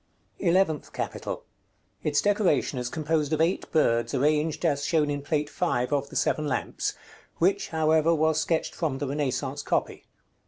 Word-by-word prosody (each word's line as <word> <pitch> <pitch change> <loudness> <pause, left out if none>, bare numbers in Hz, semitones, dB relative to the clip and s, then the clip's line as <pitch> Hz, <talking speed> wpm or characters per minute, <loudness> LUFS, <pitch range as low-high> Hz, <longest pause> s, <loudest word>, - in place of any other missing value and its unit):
ELEVENTH 170 -4 +1
CAPITAL. - - -4 0.6
Its 145 -1 +1
decoration 200 -10 +2
is 125 -1 -3
composed 155 0 -1
of 155 - +1
eight 165 +4 0
birds, 120 -6 +2
arranged 150 +4 +1
as 145 -3 +1
shown 150 -1 +2
in 145 0 -2
Plate 150 +1 -1
V. 180 - -5 0.3
of 140 -1 0
the - - -11
"Seven 150 -1 +1
Lamps," 140 - -2 0.4
which, 190 +4 +2
however, 160 0 +3
was 155 0 +2
sketched 165 0 -1
from 155 -6 -2
the 145 - -3
Renaissance 140 0 -2
copy. - - -2
150 Hz, 155 wpm, -27 LUFS, 145-160 Hz, 0.6 s, however